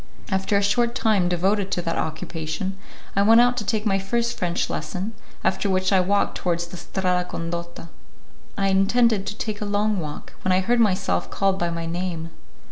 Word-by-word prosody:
After 190 +2 +1
a 200 - +1
short 235 +4 +2
time 210 -8 +2
devoted 190 +3 +1
to 175 - 0
that 165 -1 -1
occupation, 160 +3 -3 0.4
I 200 - +3
went 225 +3 +7
out 245 +1 +5
to 220 - -1
take 215 +1 -1
my 195 -2 +2
first 235 +4 -1
French 175 -1 -1
lesson, 195 +5 -4 0.3
after 200 - +1
which 185 +1 +1
I 190 - +6
walked 200 +3 +1
towards 170 -1 0
the 170 +1 -9
Strada 180 0 0
Condotta. 170 0 -5 0.7
I 195 0 +2
intended 200 +2 +3
to 210 - -4
take 215 -2 -4
a - - -1
long 205 0 +1
walk, 150 -3 -7
when 185 - 0
I 185 - +3
heard 240 +5 +2
myself 90 - +1
called 195 - +1
by 175 - 0
my 170 0 -3
name. 170 -1 -3
190 Hz, 190 wpm, -24 LUFS, 175-210 Hz, 0.7 s, went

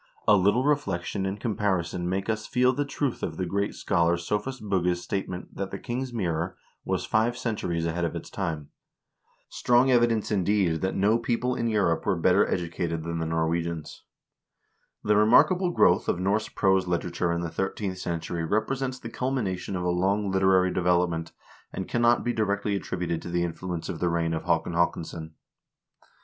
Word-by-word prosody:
A 105 - +7
little 100 +6 +3
reflection 100 -10 0
and 95 +2 -4
comparison 95 -5 -1
make 95 +1 -2
us 110 -1 -2
feel 125 +1 +3
the 145 +2 -1
truth 140 -2 -2
of - - -3
the 95 - -1
great 100 +3 -1
scholar 85 0 +1
Sophus 105 +9 -3
Bugge's 90 -4 0
statement 95 -2 -4
that 100 0 -3
"The 100 - -5
King's 125 +4 -4
Mirror" 90 -6 -2 0.3
"was - - -1
five 115 +3 +1
centuries 90 -9 -2
ahead 85 +1 -1
of 85 - -1
its - - -7
time." 75 -3 -3 0.8
Strong 125 +2 +3
evidence, 120 -3 +2
indeed, 95 -4 +1
that 95 - -1
no 105 +4 +3
people 120 +2 0
in 115 -2 -1
Europe 100 -7 +1
were - - +3
better - - +3
educated 85 -1 -2
than 85 0 -3
the 80 - -2
Norwegians. 80 0 -2 1.0
The 105 - +3
remarkable 150 - +5
growth 175 - +3
of - - 0
Norse 100 +4 0
prose 95 -2 +2
literature 85 0 -1
in 85 0 -1
the 85 -1 -4
thirteenth 95 +1 -3
century 85 -1 -3
represents 130 +8 -1
the 120 - -8
culmination 115 -7 -2
of 90 - -2
a 90 - 0
long 95 +3 +1
literary 95 -1 +3
development, 85 -2 +1 0.4
and 95 - -5
cannot 120 0 +3
be 120 - 0
directly 105 -2 0
attributed 90 -3 -3
to - - -7
the 85 0 0
influence 85 0 -4
of - - -5
the 90 - +1
reign 85 -1 0
of 80 - -3
Haakon 85 0 +1
Haakonsson. 80 -1 -1
95 Hz, 170 wpm, -27 LUFS, 85-110 Hz, 1.0 s, A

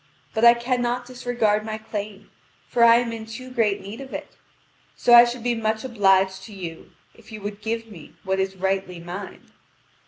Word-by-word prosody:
But 220 - -1
I 235 0 +9
cannot 245 0 -1
disregard 245 -4 0
my 215 0 -4
claim, 210 -2 -7 0.4
for 235 - +2
I 230 0 +8
am 235 -1 +1
in 220 -1 -7
too 255 +3 -9
great 225 -5 +1
need 205 +6 -8
of 270 - -8
it. - - -8 0.6
So 240 - +3
I 240 0 +10
should 240 -1 -5
be 245 0 +1
much 220 -1 -1
obliged 195 -5 +2
to 215 - -11
you 170 -4 -8 0.2
if 230 0 -18
you 215 - -7
would 205 +1 -6
give 225 +1 -3
me 195 -9 -13
what 190 0 -1
is 190 0 -1
rightly 190 -1 -2
mine." 180 +3 -9
220 Hz, 190 wpm, -23 LUFS, 195-240 Hz, 0.6 s, I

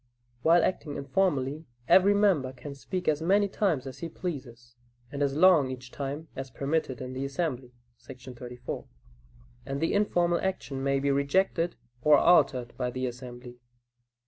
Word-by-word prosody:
While 165 +3 +5
acting 150 -5 -2
informally, 145 0 -1 0.2
every 200 +2 +6
member 180 -11 +2
can 140 +3 -8
speak 180 +6 -5
as 150 0 +2
many 200 +5 +3
times 185 -9 0
as 130 - -8
he 170 - -5
pleases, 125 -9 -7 0.4
and 140 - -5
as 140 -1 +1
long 160 -5 +5
each 125 -1 -8
time 145 +3 -5
as 135 0 -6
permitted 140 0 -2
in 130 0 -6
the 130 +1 -4
assembly 135 -3 -3 0.3
[§ 130 -1 -11
34], 125 0 -7 0.8
and 135 0 -4
the 165 - 0
informal 175 -4 +2
action 185 -8 -3
may 140 0 +1
be 140 +1 +1
rejected 165 +5 +1 0.3
or 150 +3 +6
altered 130 -8 +3
by 125 - -1
the 130 +1 -3
assembly. 125 0 -8
140 Hz, 155 wpm, -28 LUFS, 130-170 Hz, 0.8 s, every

